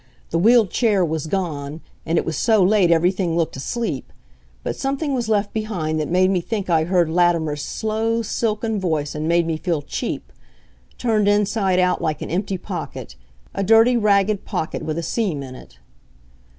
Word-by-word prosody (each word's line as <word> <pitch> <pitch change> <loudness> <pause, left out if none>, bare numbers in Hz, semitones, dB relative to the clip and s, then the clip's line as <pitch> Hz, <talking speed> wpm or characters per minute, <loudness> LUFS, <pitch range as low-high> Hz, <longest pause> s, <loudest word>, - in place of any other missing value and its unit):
The 165 - +1
wheeled 225 +1 +5
chair 210 -6 +2
was 160 -1 -3
gone. 155 -4 -3 0.3
And 165 +1 +1
it - - +1
was 160 - -2
so 220 - +3
late 190 -2 +4
everything 175 +1 +2
looked 165 -2 0
asleep. 160 - -4 0.5
But - - -3
something 275 +2 -2
was 240 -4 -2
left 205 -1 +1
behind 180 -8 -2
that 150 - -2
made 185 +2 +3
me 185 -2 +1
think 200 -1 -3
I 160 -1 +3
heard 175 -1 +2
Latimer's 165 -3 +1
slow, 225 +4 -1
silken 220 0 -1
voice, 155 -6 -1
and 155 +1 -3
made 170 0 +3
me 165 -1 -1
feel 165 -3 -2
cheap - - -5 0.6
turned 215 -4 +1
inside 205 -2 +2
out 180 0 +2
like 155 -1 -2
an - - -6
empty 190 +2 -1
pocket 115 - -7 0.4
a 195 - -2
dirty, 225 +4 +5
ragged 205 -2 +2
pocket 160 - -3
with 155 0 -3
a 170 - -2
seam 165 -6 -1
in 130 -1 -9
it. - - -14
185 Hz, 175 wpm, -21 LUFS, 160-215 Hz, 0.6 s, wheeled